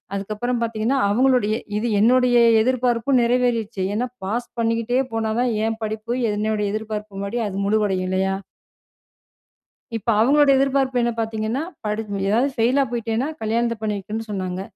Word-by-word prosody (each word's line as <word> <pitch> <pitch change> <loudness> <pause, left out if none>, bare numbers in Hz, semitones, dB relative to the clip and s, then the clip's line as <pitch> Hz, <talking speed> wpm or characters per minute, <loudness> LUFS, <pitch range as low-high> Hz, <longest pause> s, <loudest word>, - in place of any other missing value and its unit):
அதுக்கப்பறம் 215 +5 -2
பார்த்தீங்கன்னா, 230 +3 0
அவுங்களுடைய 245 -1 +2 0.2
இது 230 +3 -1
என்னுடைய 245 +2 +4 0.2
எதிர்பார்ப்பும் 250 +1 +1
நிறைவேறிருச்சு. 235 -4 0
ஏன்னா 230 +4 0 0.2
பாஸ் 235 +5 -2
பண்ணிக்கிட்டே 230 +2 +1
போனா 225 -1 -1
தான், 250 0 +1
ஏன் 225 0 -1
படிப்பு 215 +1 -4 0.2
என்னுடைய 210 0 -1
எதிர்பார்ப்பு 215 -1 -5
முன்னாடி 200 +4 -3
அது 195 - -6
முழுவடையும் 200 -3 +1
இல்லையா! 190 +1 0 1.6
இப்ப 225 +2 -4
அவுங்களுடைய 280 +4 +5
எதிர்பார்ப்பு 270 -2 +1
என்ன? 240 0 +1
பார்த்தீங்கன்னா 220 +3 -2 0.2
படி 210 +1 -1 0.3
எதாவது 240 +7 +2
ஃபெயிலா 250 +4 +3
போயிட்டேன்னா, 235 +2 -1
கல்யாணத்த 230 +2 0
பண்ணி 215 -1 -1
வைக்கன்னு 215 +3 -6
சொன்னாங்க. 185 -2 -3
225 Hz, 135 wpm, -22 LUFS, 210-245 Hz, 1.6 s, அவுங்களுடைய